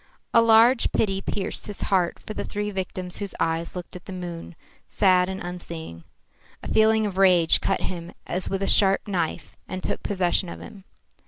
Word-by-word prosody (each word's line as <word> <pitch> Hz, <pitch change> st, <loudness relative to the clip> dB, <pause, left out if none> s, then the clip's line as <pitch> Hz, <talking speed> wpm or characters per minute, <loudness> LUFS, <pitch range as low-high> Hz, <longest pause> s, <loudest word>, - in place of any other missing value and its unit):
A 230 Hz, -, +7 dB
large 230 Hz, +2 st, +5 dB
pity 195 Hz, -3 st, 0 dB
pierced 195 Hz, 0 st, -4 dB
his 205 Hz, -, -6 dB
heart 185 Hz, -3 st, +1 dB
for 215 Hz, -, -8 dB
the -, -, -4 dB
three 210 Hz, 0 st, -3 dB
victims 185 Hz, -1 st, -5 dB
whose 200 Hz, -2 st, -5 dB
eyes 165 Hz, +1 st, -1 dB
looked 180 Hz, 0 st, -7 dB
at 180 Hz, -, -10 dB
the -, -, -8 dB
moon, 175 Hz, -2 st, -7 dB, 0.3 s
sad 185 Hz, -2 st, +3 dB
and 190 Hz, 0 st, -4 dB
unseeing. 170 Hz, -, -8 dB, 0.6 s
A -, -, -6 dB
feeling 220 Hz, 0 st, +4 dB
of 195 Hz, -2 st, -3 dB
rage 180 Hz, -4 st, +5 dB
cut 195 Hz, -, 0 dB
him 170 Hz, -2 st, -5 dB
as 180 Hz, +1 st, +2 dB
with 195 Hz, 0 st, -2 dB
a -, -, -1 dB
sharp 195 Hz, -1 st, +3 dB
knife 175 Hz, -5 st, -3 dB
and 185 Hz, 0 st, -6 dB
took -, -, -3 dB
possession 185 Hz, -2 st, 0 dB
of -, -, -8 dB
him. 195 Hz, -2 st, -12 dB
190 Hz, 185 wpm, -24 LUFS, 175-205 Hz, 0.6 s, A